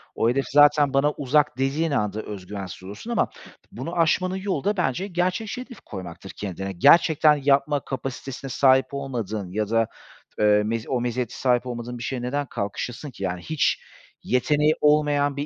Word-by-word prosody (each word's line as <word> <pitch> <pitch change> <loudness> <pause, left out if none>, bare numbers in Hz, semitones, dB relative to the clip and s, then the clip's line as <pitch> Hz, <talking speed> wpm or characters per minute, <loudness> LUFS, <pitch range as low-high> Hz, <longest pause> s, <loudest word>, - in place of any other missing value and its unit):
"O 115 - +2
hedef 135 +2 0
zaten 145 0 +5
bana 145 +2 +3
uzak." 145 -1 +1
dediğin 145 +5 0
anda 105 -5 -1
öz 100 -4 -8
güvensiz 95 -2 -7
olursun 105 - -8
ama 230 - +1 0.4
bunu 170 +2 -6
aşmanın 180 +3 +2
yolu 190 -6 -2
da 205 0 0
bence 180 +4 0
gerçekçi 185 +6 -2
hedef 250 -3 -11
koymaktır 95 -1 -9
kendine. 95 -1 -4
Gerçekten 155 - +5
yapma 140 +1 +3
kapasitesine 135 0 -5
sahip 130 +1 +4
olmadığın 110 -9 -4
ya 105 +1 -2
da, 115 0 +2 0.5
eee, 105 0 +4
mezi 115 +1 -3
o 125 -3 0
meziyete 120 -1 -2
sahip 125 -1 +1
olmadığın 120 0 -5
bir 120 - -7
şeye 130 -2 -3
neden 140 +3 -2
kalkışasın 120 +5 -5
ki? 100 - -9
Yani, 90 -1 -2
hiç 155 - 0 0.4
yeteneği 150 +4 +2
olmayan 145 -1 +3
bir 145 - -2
135 Hz, 165 wpm, -24 LUFS, 110-150 Hz, 0.5 s, zaten